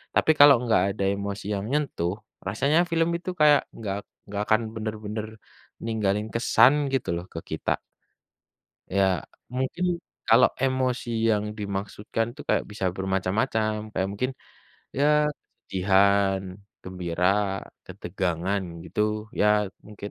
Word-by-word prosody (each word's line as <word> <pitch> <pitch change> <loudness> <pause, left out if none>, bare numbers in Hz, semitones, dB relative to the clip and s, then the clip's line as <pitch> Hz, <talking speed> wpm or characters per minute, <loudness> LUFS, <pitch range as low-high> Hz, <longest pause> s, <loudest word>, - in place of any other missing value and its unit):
Tapi, 160 - +4
kalau 145 -1 +10
enggak 115 -6 +3
ada 100 - -2
emosi 100 0 -4
yang 100 - -3
nyentuh, 140 - 0 0.3
rasanya 140 +10 +2
film 165 0 +2
itu 180 - -7
kayak 150 -2 +6
enggak 100 -3 -3 0.3
enggak 100 0 -4
akan 110 +1 +4
bener-bener 110 -1 -4 0.6
ninggalin 105 -2 0
kesan 120 +3 +5 0.2
gitu 130 - 0
loh 85 +1 -5
ke 80 - -4
kita. - - 0 1.2
Ya, 95 -4 +2 0.2
mungkin 130 +8 -2 0.4
kalau 115 +3 +7
emosi 130 -2 0 0.2
yang 105 -1 +2
dimaksudkan 105 +2 -3
itu - - -10
kayak - - +2
bisa 100 -2 -3
bermacam-macam, 105 +3 -1
kayak 95 -1 -1
mungkin 125 +6 -2 0.7
ya 145 - +3 0.3
kesedihan, 100 -2 +1 0.4
gembira, 90 -1 -2 0.6
ketegangan, 95 +1 -2 0.2
gitu - - -4 0.4
ya 105 - +5 0.4
mungkin 105 -1 -8
105 Hz, 120 wpm, -26 LUFS, 95-120 Hz, 1.2 s, kalau